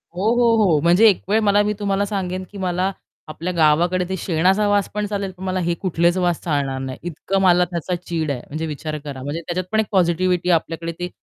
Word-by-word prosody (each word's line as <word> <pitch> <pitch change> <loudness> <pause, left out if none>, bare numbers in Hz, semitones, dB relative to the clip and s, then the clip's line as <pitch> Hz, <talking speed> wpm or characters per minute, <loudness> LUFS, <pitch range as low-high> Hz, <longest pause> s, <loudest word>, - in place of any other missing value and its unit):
हो, 180 - -4
हो, 235 -1 +4
हो, 165 -7 +3
म्हणजे 175 +7 +5
एक 195 - 0
वेळ 215 +2 +3
मला 205 0 +4
मी 210 0 0
तुम्हाला 200 -1 0
सांगेन 185 -2 -3
की 205 - -10
मला 185 0 -1 0.4
आपल्या 165 +3 -4
गावाकडे 170 +3 +3
ते 190 - -1
शेणाचा 185 +5 +1
वास 205 -1 +1
पण 210 0 -1
चालेल, 200 -2 -3
पण 185 0 -12
मला 185 0 -1
हे 175 -1 0
कुठलेच 175 -1 +1
वास 175 -2 +1
चालणार 140 -4 -1
नाही. 130 -1 -5
इतकं 185 +3 -2
मला 180 -1 +4
त्याचा 175 +1 -2
चीड 165 -4 -3
आहे 125 - -4
म्हणजे 155 +3 -4
विचार 155 +1 -5
करा. 140 -3 -7
म्हणजे 145 +4 -4
त्याच्यात 175 +2 -3
पण 220 - +2
एक 220 - +2
पॉझिटिव्हिटी 180 -1 +1
आहे 175 - +6
आपल्याकडे 165 +1 -3
ते 180 0 -3
180 Hz, 225 wpm, -21 LUFS, 165-195 Hz, 0.4 s, आहे